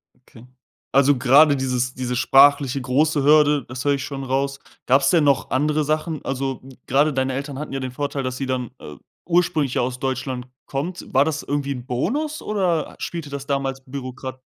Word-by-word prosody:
Okay, 125 Hz, -2 st, -18 dB, 0.5 s
also 140 Hz, 0 st, +4 dB
grade 140 Hz, +4 st, +6 dB
dieses 125 Hz, -2 st, -1 dB
diese 125 Hz, -1 st, -3 dB
sprachliche 140 Hz, 0 st, +4 dB
große 145 Hz, +3 st, +1 dB
Hürde, 150 Hz, -2 st, +4 dB
das 130 Hz, +2 st, -6 dB
höre 145 Hz, -, +3 dB
ich 140 Hz, -2 st, -2 dB
schon 135 Hz, +1 st, -5 dB
raus. 135 Hz, +1 st, -1 dB, 0.3 s
Gab's 135 Hz, +1 st, +4 dB
denn 170 Hz, -3 st, +4 dB
noch 140 Hz, -2 st, +2 dB
andere 150 Hz, +3 st, +1 dB
Sachen? 155 Hz, +1 st, -2 dB
Also 135 Hz, 0 st, -3 dB, 0.3 s
grade 145 Hz, +3 st, +3 dB
deine 130 Hz, 0 st, 0 dB
Eltern 140 Hz, +1 st, -5 dB
hatten 150 Hz, -2 st, -6 dB
ja 135 Hz, -, -2 dB
den 130 Hz, -1 st, -4 dB
Vorteil, 140 Hz, +1 st, -3 dB
dass 130 Hz, 0 st, -3 dB
sie 135 Hz, -, -3 dB
dann, 130 Hz, -2 st, -3 dB
äh, 75 Hz, -, -10 dB, 0.3 s
ursprünglich 170 Hz, -6 st, +1 dB
ja -, -, +1 dB
aus 125 Hz, +1 st, -3 dB
Deutschland 130 Hz, -1 st, -3 dB, 0.2 s
kommt. 165 Hz, +7 st, -4 dB
War 135 Hz, +2 st, +5 dB
das 150 Hz, -1 st, -2 dB
irgendwie 140 Hz, 0 st, -2 dB
'n 125 Hz, -2 st, -8 dB
Bonus 280 Hz, -, -2 dB
oder 185 Hz, -6 st, -1 dB
spielte 165 Hz, -4 st, -5 dB
das 140 Hz, -1 st, -6 dB
damals 135 Hz, -1 st, -2 dB
bürokra 130 Hz, -1 st, -7 dB
135 Hz, 185 wpm, -22 LUFS, 130-150 Hz, 0.5 s, grade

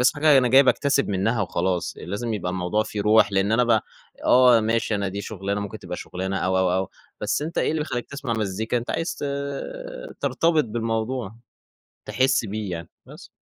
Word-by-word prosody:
بس 125 Hz, -, +5 dB
في -, -, -27 dB
حاجة 145 Hz, -2 st, +5 dB
أنا 125 Hz, -1 st, +3 dB
جاي 135 Hz, +3 st, +7 dB
باكتسب 140 Hz, 0 st, +2 dB
منّها 105 Hz, +4 st, 0 dB
وخلاص، 90 Hz, 0 st, -1 dB
لازم 110 Hz, +5 st, -3 dB
يبقى 90 Hz, -3 st, -3 dB
الموضوع 95 Hz, +4 st, 0 dB
فيه 105 Hz, -1 st, -5 dB
روح، 105 Hz, -1 st, +4 dB
لإن 95 Hz, +2 st, +2 dB
أنا 125 Hz, +2 st, +4 dB
ب 115 Hz, -2 st, +3 dB, 0.4 s
آه، 125 Hz, -2 st, +6 dB
ماشي 110 Hz, 0 st, 0 dB
أنا 100 Hz, -1 st, -1 dB
دي 100 Hz, +2 st, -5 dB
شُغلانة 100 Hz, 0 st, -3 dB
ممكن 100 Hz, +2 st, -6 dB
تبقى 90 Hz, -2 st, -6 dB
شٌغلانة 95 Hz, +1 st, -4 dB
أو 95 Hz, 0 st, +1 dB
أو 95 Hz, -1 st, +2 dB
أو 95 Hz, 0 st, -1 dB, 0.3 s
بس 105 Hz, +7 st, 0 dB
أنت 165 Hz, +2 st, -4 dB
إيه -, -, +2 dB
اللي 160 Hz, -1 st, -1 dB
بيخلّيك 120 Hz, -5 st, -4 dB
تسمع 140 Hz, -4 st, -4 dB
مزّيكا؟ 110 Hz, +2 st, -1 dB
أنت 120 Hz, -, -3 dB
عايز 165 Hz, 0 st, -2 dB
ت -, -, -6 dB, 1.0 s
ترتبط 165 Hz, -2 st, +2 dB
بالموضوع، 115 Hz, 0 st, -3 dB, 0.7 s
تحس 130 Hz, -2 st, +2 dB
بيه 105 Hz, -1 st, -4 dB
يعني، 85 Hz, -1 st, -6 dB, 0.2 s
بس. -, -, -13 dB
110 Hz, 190 wpm, -24 LUFS, 95-125 Hz, 1.0 s, جاي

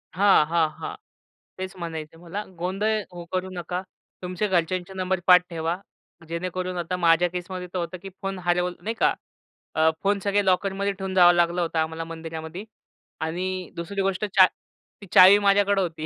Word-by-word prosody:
हां, 195 Hz, -4 st, +5 dB
हां, 160 Hz, 0 st, +2 dB
हां. -, -, -5 dB, 0.6 s
तेच 190 Hz, +1 st, -5 dB
म्हणायचे 165 Hz, -2 st, -6 dB
मला. 175 Hz, +5 st, -6 dB, 0.2 s
गोंधळ 195 Hz, +5 st, 0 dB, 0.2 s
हो, 175 Hz, -1 st, -8 dB
करू 185 Hz, 0 st, -2 dB
नका. 180 Hz, +1 st, -3 dB, 0.4 s
तुमच्या 185 Hz, +3 st, -2 dB
घरच्यांचे 180 Hz, 0 st, -1 dB
नंबर 185 Hz, 0 st, -1 dB
पाठ 180 Hz, -1 st, +8 dB
ठेवा. 165 Hz, 0 st, -2 dB, 0.5 s
जेणेकरून 180 Hz, +2 st, -3 dB
आता 175 Hz, +1 st, -2 dB
माझ्या 170 Hz, 0 st, +4 dB
केसमध्ये 180 Hz, +1 st, -5 dB
तर -, -, -2 dB
होतं 175 Hz, +2 st, -4 dB
की 195 Hz, -, -8 dB
फोन 195 Hz, -1 st, -3 dB
हरवलंय, 180 Hz, 0 st, 0 dB
नाही 225 Hz, -, -2 dB
का? -, -, +4 dB, 0.6 s
अ, 160 Hz, 0 st, +4 dB
फोन 200 Hz, 0 st, +2 dB
सगळे 205 Hz, 0 st, +1 dB
लॉकरमध्ये 195 Hz, +1 st, +1 dB
ठेवून 190 Hz, 0 st, -5 dB
जावं 175 Hz, -1 st, +7 dB
लागलं 175 Hz, 0 st, +2 dB
होतं 165 Hz, -1 st, -1 dB
आम्हाला 160 Hz, +1 st, -2 dB
मंदिरामध्ये 165 Hz, +3 st, -7 dB, 0.6 s
आणि 180 Hz, +3 st, -3 dB
दुसरी 195 Hz, +4 st, -3 dB
गोष्ट 195 Hz, +1 st, 0 dB
चा 195 Hz, -2 st, +6 dB, 0.6 s
ती -, -, -9 dB
चावी 190 Hz, +2 st, +9 dB
माझ्याकडं 200 Hz, 0 st, +3 dB
होती. 165 Hz, -4 st, -3 dB
180 Hz, 165 wpm, -25 LUFS, 170-190 Hz, 0.6 s, चावी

